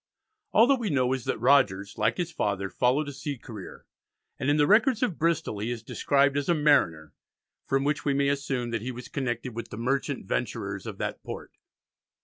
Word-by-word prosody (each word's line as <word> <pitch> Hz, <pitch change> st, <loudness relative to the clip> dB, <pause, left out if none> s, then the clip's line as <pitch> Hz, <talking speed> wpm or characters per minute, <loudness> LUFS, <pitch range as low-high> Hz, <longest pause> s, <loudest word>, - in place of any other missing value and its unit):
All 225 Hz, -, +6 dB
that 270 Hz, 0 st, +3 dB
we 225 Hz, -4 st, -2 dB
know 130 Hz, -4 st, +2 dB
is 130 Hz, -3 st, -4 dB
that -, -, -1 dB
Rogers, 115 Hz, -6 st, +3 dB
like 115 Hz, +2 st, +1 dB
his 175 Hz, -2 st, -2 dB
father, 100 Hz, -9 st, -2 dB
followed 130 Hz, +4 st, +1 dB
a -, -, -4 dB
sea 145 Hz, 0 st, -5 dB
career, 110 Hz, -5 st, -10 dB, 0.5 s
and 135 Hz, -, 0 dB
in 145 Hz, -, +3 dB
the 145 Hz, -, +4 dB
records 225 Hz, -, +4 dB
of 195 Hz, -10 st, -1 dB
Bristol 160 Hz, -9 st, 0 dB
he 110 Hz, +3 st, -2 dB
is 120 Hz, -1 st, -4 dB
described 140 Hz, +3 st, +2 dB
as 145 Hz, +2 st, -1 dB
a 170 Hz, -, +4 dB
"mariner," 85 Hz, -, +2 dB, 0.5 s
from 135 Hz, 0 st, +1 dB
which 145 Hz, +1 st, 0 dB
we 140 Hz, -2 st, +1 dB
may 140 Hz, 0 st, +2 dB
assume 135 Hz, -4 st, -2 dB
that 115 Hz, -2 st, -2 dB
he 125 Hz, +3 st, -4 dB
was 125 Hz, 0 st, -8 dB
connected 125 Hz, -2 st, -3 dB
with 115 Hz, 0 st, -5 dB
the -, -, -8 dB
Merchant 130 Hz, +4 st, -1 dB
Venturers -, -, -3 dB
of -, -, -6 dB
that -, -, -4 dB
Port. -, -, -8 dB
135 Hz, 205 wpm, -27 LUFS, 115-145 Hz, 0.5 s, All